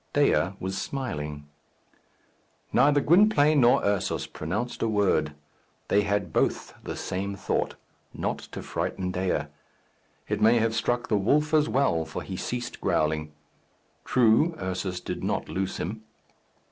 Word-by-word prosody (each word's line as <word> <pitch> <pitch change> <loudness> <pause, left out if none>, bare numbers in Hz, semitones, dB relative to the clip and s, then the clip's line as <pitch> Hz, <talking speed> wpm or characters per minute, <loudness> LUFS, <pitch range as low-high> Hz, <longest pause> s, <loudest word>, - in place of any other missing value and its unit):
Dea 90 - +3
was 95 +1 -3
smiling. 75 - -4 1.3
Neither 145 +3 +4
Gwynplaine 155 -4 +5
nor 120 0 +5
Ursus 100 -1 0
pronounced 105 +10 -4
a 115 - +2
word. 100 -8 +1 0.5
They 100 - +4
had 100 -5 -1
both - - 0
the - - -5
same 100 +2 -3
thought - - -1 0.4
not - - -3
to - - -9
frighten 90 -1 -3
Dea. 90 0 0 0.9
It - - -2
may 115 +2 +6
have 115 0 +1
struck 120 +2 0
the 105 - +2
wolf 150 +10 +2
as 155 0 +4
well, 125 -12 +2
for 80 - -6
he 95 - -6
ceased 120 +6 -4
growling. 75 0 0 0.7
True, 125 +7 +3
Ursus 95 -1 -3
did - - -5
not - - -2
loose 95 0 -2
him. 105 +7 -4
105 Hz, 135 wpm, -27 LUFS, 90-125 Hz, 1.3 s, may